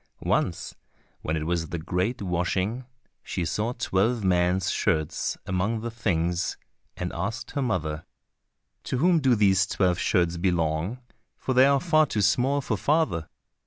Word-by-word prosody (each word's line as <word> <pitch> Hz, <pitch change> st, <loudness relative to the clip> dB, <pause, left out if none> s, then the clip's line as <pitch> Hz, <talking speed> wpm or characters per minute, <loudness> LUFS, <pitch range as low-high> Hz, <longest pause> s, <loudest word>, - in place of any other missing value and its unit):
Once, -, -, 0 dB, 0.5 s
when 80 Hz, +1 st, -1 dB
it 80 Hz, -, -3 dB
was 85 Hz, -1 st, -1 dB
the 85 Hz, -, -3 dB
great 90 Hz, +8 st, -2 dB
washing, 95 Hz, +7 st, -1 dB, 0.4 s
she 90 Hz, -, -3 dB
saw 105 Hz, +7 st, -1 dB
twelve 115 Hz, 0 st, 0 dB
men's 90 Hz, 0 st, +2 dB
shirts 80 Hz, -1 st, 0 dB
among 100 Hz, +5 st, -1 dB
the 115 Hz, +1 st, -4 dB
things, 90 Hz, -6 st, -1 dB, 0.4 s
and 90 Hz, 0 st, -4 dB
asked 110 Hz, +6 st, -4 dB
her 140 Hz, -, -2 dB
mother, 80 Hz, -, -2 dB, 0.8 s
"To -, -, -2 dB
whom 170 Hz, +4 st, +4 dB
do 130 Hz, -4 st, +3 dB
these 100 Hz, -2 st, +3 dB
twelve 90 Hz, -3 st, +1 dB
shirts 85 Hz, -3 st, +1 dB
belong, 85 Hz, +3 st, 0 dB, 0.4 s
for 130 Hz, -, -2 dB
they 130 Hz, +2 st, +6 dB
are 140 Hz, 0 st, +4 dB
far 155 Hz, 0 st, +3 dB
too 105 Hz, -5 st, -1 dB
small 135 Hz, +7 st, +2 dB
for 110 Hz, -5 st, -2 dB
father?" 140 Hz, -, 0 dB
95 Hz, 150 wpm, -26 LUFS, 85-120 Hz, 0.8 s, they